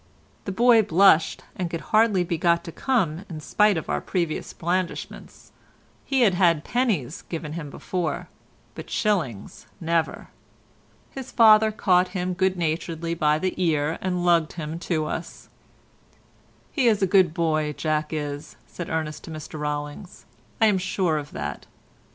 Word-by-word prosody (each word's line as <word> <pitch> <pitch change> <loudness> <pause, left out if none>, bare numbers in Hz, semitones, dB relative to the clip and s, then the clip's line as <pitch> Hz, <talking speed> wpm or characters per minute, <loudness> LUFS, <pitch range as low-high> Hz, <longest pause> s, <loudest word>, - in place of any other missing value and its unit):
The 195 - -3
boy 235 +3 +5
blushed 190 -4 +4
and 180 -2 -3
could 165 -1 -4
hardly 215 -4 +4
be 170 0 -2
got 170 0 +2
to 165 - -7
come 185 - 0
in 160 -3 -6
spite 210 +5 +2
of 160 - -4
our - - -1
previous 170 -4 -2
blandishments; 180 +1 -4 0.5
he 270 -2 0
had 210 -6 +5
had 170 -4 +3
pennies 200 - -1
given 160 -3 -5
him 160 -3 -6
before, 170 -1 -3 0.5
but - - -9
shillings 165 - -2
never. 165 -1 -1 0.8
His 265 -1 -8
father 220 -2 +6
caught 185 -4 +3
him 180 0 -1
good 190 +1 +1
naturedly 165 0 -2
by 150 -2 +2
the 185 +3 -1
ear 155 -1 0
and 180 -1 -1
lugged 170 -3 +3
him 160 -1 -5
to 155 -3 +1
us. 165 +2 -6 1.2
"He's 230 -8 +2
a - - +6
good 185 -2 +4
boy, 155 -2 0
Jack 155 0 -1
is," 150 -1 -5
said 175 - -7
Ernest 155 -1 -3
to - - -10
Mr 155 -1 -7
Rollings, 150 +4 -5 0.3
"I'm 210 -4 +4
sure 180 -4 0
of 145 0 -8
that." - - -5
170 Hz, 150 wpm, -24 LUFS, 155-190 Hz, 1.2 s, father